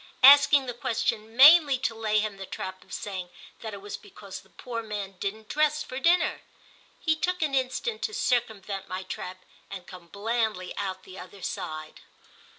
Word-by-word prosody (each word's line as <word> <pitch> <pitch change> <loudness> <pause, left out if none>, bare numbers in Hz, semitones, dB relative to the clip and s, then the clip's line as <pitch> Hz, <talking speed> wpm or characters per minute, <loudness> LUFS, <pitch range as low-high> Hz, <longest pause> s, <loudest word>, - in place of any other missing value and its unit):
—asking 285 0 +8
the 245 - -4
question 230 -2 -2
mainly 290 0 +8
to 250 -2 -1
lay 220 -1 0
him 210 -1 -1
the 195 - -7
trap 185 0 -6
of 190 - -22
saying 185 -3 -5 0.3
that 220 - -6
it 200 - -10
was 205 - -6
because 200 -1 -10
the - - -24
poor 235 -2 -6
man 210 -3 -5
didn't 215 +2 -4
dress 305 +2 +1
for 255 -3 -6
dinner. 345 +4 +3 0.6
He 320 -1 +1
took 360 +2 -1
an 295 -3 -1
instant 270 - -1
to 430 - -2
circumvent 210 -5 -1
my 185 +1 -4
trap 185 0 -7 0.2
and 190 -2 -8
come 180 -1 -12
blandly 215 -1 -2
out 190 -2 -4
the 190 0 -11
other 185 +1 -11
side. 155 0 -5
220 Hz, 175 wpm, -27 LUFS, 195-265 Hz, 0.6 s, asking